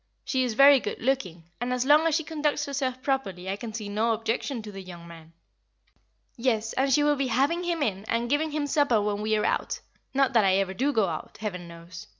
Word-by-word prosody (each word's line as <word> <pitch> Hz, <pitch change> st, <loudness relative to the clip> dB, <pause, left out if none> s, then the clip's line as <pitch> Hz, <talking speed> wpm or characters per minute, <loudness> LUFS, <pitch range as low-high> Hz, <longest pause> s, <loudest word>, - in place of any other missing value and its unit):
She 260 Hz, -1 st, +1 dB
is 240 Hz, -3 st, -2 dB
very 275 Hz, +2 st, +8 dB
good -, -, -5 dB
looking, 220 Hz, -10 st, -1 dB, 0.2 s
and 245 Hz, +1 st, -2 dB
as 250 Hz, 0 st, 0 dB
long 300 Hz, +3 st, +5 dB
as 320 Hz, -, +2 dB
she 320 Hz, -, 0 dB
conducts 300 Hz, -1 st, -1 dB
herself 265 Hz, -3 st, -3 dB
properly 195 Hz, -10 st, -2 dB
I 190 Hz, -, -1 dB
can 220 Hz, +2 st, -7 dB
see 215 Hz, -1 st, -5 dB
no 220 Hz, +3 st, +1 dB
objection 225 Hz, +2 st, -2 dB
to 210 Hz, -, -8 dB
the 195 Hz, -1 st, -8 dB
young 175 Hz, -2 st, -11 dB
man." 165 Hz, -1 st, -13 dB, 1.0 s
"Yes, 225 Hz, -3 st, 0 dB
and 270 Hz, +1 st, +1 dB
she 290 Hz, +3 st, +4 dB
will 295 Hz, 0 st, +3 dB
be 275 Hz, -1 st, 0 dB
having 280 Hz, +9 st, +1 dB
him 340 Hz, -3 st, -1 dB
in, 200 Hz, -4 st, -2 dB
and 230 Hz, +1 st, -1 dB
giving 295 Hz, +5 st, +1 dB
him 300 Hz, -1 st, -2 dB
supper 285 Hz, -6 st, +2 dB
when 205 Hz, 0 st, -1 dB
we 215 Hz, 0 st, +1 dB
are 210 Hz, -, 0 dB
out -, -, -1 dB, 0.3 s
not 270 Hz, -1 st, +2 dB
that 225 Hz, -3 st, +5 dB
I 190 Hz, -1 st, +3 dB
ever 195 Hz, -1 st, 0 dB
do 270 Hz, +9 st, 0 dB
go 220 Hz, -7 st, +2 dB
out, 160 Hz, -2 st, -6 dB
Heaven 180 Hz, -5 st, -5 dB
knows! 170 Hz, 0 st, -11 dB
235 Hz, 230 wpm, -26 LUFS, 205-275 Hz, 1.0 s, very